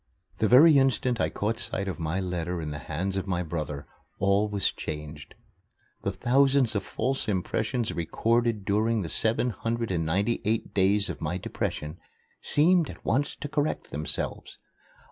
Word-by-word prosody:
The 110 - +3
very 140 +5 +8
instant 130 -2 +1
I - - +1
caught 110 +3 -2
sight 110 -4 -2
of 95 - -4
my 80 +3 -1
letter 90 -2 -3
in 75 -2 -4
the 75 - -5
hands 90 +6 -3
of 95 - -3
my 90 -2 -1
brother, 75 -3 -4 0.3
all 100 +2 +2
was 100 -1 0
changed. 75 -1 -7 0.7
The - - -1
thousands 135 -1 +3
of 100 - 0
false 130 +7 -2
impressions 110 +4 -1
recorded 115 +5 0
during 110 +1 +1
the 85 - -5
seven 115 +7 +2
hundred 115 0 -3
and 85 -3 0
ninety 100 +9 0
eight 110 +1 -1
days 100 +1 +3
of - - -10
my 90 - -2
depression 75 -3 -4 0.4
seemed 170 +2 +4
at - - -11
once 140 +5 0
to 145 - -6
correct 145 +1 -2
themselves. 75 +2 -3
105 Hz, 165 wpm, -27 LUFS, 85-120 Hz, 0.7 s, very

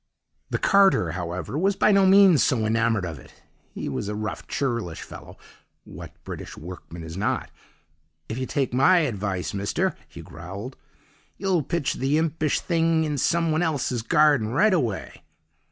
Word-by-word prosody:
"The - - -1
carter, 195 - +4
however, 90 - -4
was 195 +3 +2
by 210 - +3
no 195 -1 +5
means 190 -4 +6
so 115 -5 +1
enamoured 115 -2 +1
of 80 -5 -6
it; - - -18 0.3
he - - -4
was 100 - -3
a 105 - -3
rough, 110 +1 -5
churlish 115 - -3
fellow - - -12 0.5
(what - - -10
British - - -8
workmen 85 0 -9
is 80 0 -8
not?). 100 +3 -2 0.8
'If 110 - -5
you 130 - -3
take 135 -4 -1
my 170 +8 +5
advice, 100 - -2
mister!' 100 0 -1
he - - -11
growled, 95 - -8 0.6
'you'll 190 -4 +1
pitch 160 +1 -1
the 135 +3 0
himpish 160 -1 0
thing 165 -2 +1
in 150 -3 -2
some 165 +3 +1
one 155 +2 +1
helse's 140 -7 -1
garden 145 -2 +3
rightaway. 135 - 0
130 Hz, 155 wpm, -24 LUFS, 100-165 Hz, 0.8 s, means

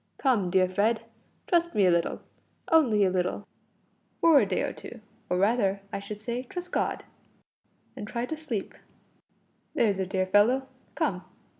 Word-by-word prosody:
Come, 230 -10 +1
dear 185 0 +3
Fred, 210 +5 +1 0.4
trust 340 -1 +1
me 200 - +4
a 180 - +5
little 170 -1 0 0.5
only 240 -11 +4
a 185 - +2
little 185 +2 -1 0.7
for 325 -4 +6
a 210 - +1
day 190 - 0
or - - -2
two, 240 - -10 0.3
or 180 - +1
rather, 200 -1 +2
I - - -2
should 205 +1 -7
say, 235 +2 -3
trust 360 +5 -7
God, - - -1 0.9
and 205 - -7
try 235 +2 -3
to 315 - -4
sleep. 275 -10 -4 1.0
There's 205 -4 +2
a 190 - -1
dear 190 -1 0
fellow 225 +8 +3 0.3
come." 185 -2 -1
210 Hz, 160 wpm, -27 LUFS, 190-255 Hz, 1.0 s, for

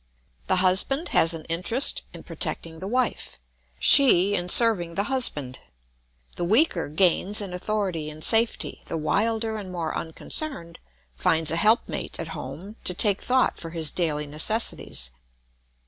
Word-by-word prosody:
The 185 - +2
husband 190 - +2
has 165 +1 +3
an 160 - -10
interest 180 +11 +1
in - - -11
protecting 160 -1 -4
the 190 - -6
wife, 250 +4 -2 0.4
she 205 -9 +6
in 175 -2 -2
serving 180 -7 +5
the 200 - 0
husband. 145 - 0 0.8
The - - -3
weaker 200 - +1
gains 185 +5 +2
in 195 -3 -5
authority 180 -5 -3
and 155 +1 -8
safety, 225 +1 +1
the 165 - -4
wilder 220 +7 -1
and 190 -3 -9
more 170 -3 -4
unconcerned 170 - -3 0.3
finds 160 - +1
a - - -1
help 215 +7 +2
mate - - -5
at - - -5
home 205 +6 -9
to 180 - -1
take 200 +1 +1
thought 255 +1 +1
for 165 - -7
his 160 -2 -3
daily 150 -4 -2
necessities. 150 - -3
180 Hz, 145 wpm, -24 LUFS, 165-220 Hz, 0.8 s, she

